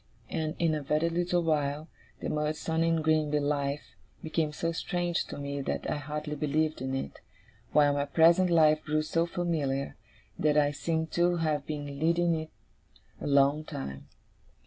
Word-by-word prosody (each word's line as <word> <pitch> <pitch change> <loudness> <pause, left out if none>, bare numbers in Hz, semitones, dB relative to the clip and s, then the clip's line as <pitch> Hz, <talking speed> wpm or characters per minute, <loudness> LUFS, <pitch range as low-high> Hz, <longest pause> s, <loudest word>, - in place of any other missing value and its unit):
And, 155 0 -2
in 165 -2 +2
a 155 - -1
very 150 +4 +1
little 175 +1 +1
while, 150 -1 0 0.3
the - - -3
Murdstone 155 +2 -1
and 165 -1 +2
Grinby 155 -1 +2
life 145 0 -2 0.3
became 160 -1 -1
so 165 +2 -2
strange 175 0 -1
to - - -8
me 140 0 -4
that - - -3
I - - -1
hardly 150 +1 -4
believed 155 0 0
in 130 0 -2
it, 70 - -5 0.5
while 145 -1 +5
my 140 0 0
present 170 +5 +5
life 155 -2 +4
grew 155 0 0
so 165 +2 0
familiar, 155 -6 -1 0.4
that 150 -1 +3
I 145 -1 +4
seemed 160 +2 -2
to 175 0 +2
have 155 -4 -1
been 145 -2 -5
leading 170 +2 +2
it 160 -1 -3 0.7
a - - -3
long 140 +2 +4
time. 70 - -7
155 Hz, 165 wpm, -29 LUFS, 145-165 Hz, 0.7 s, while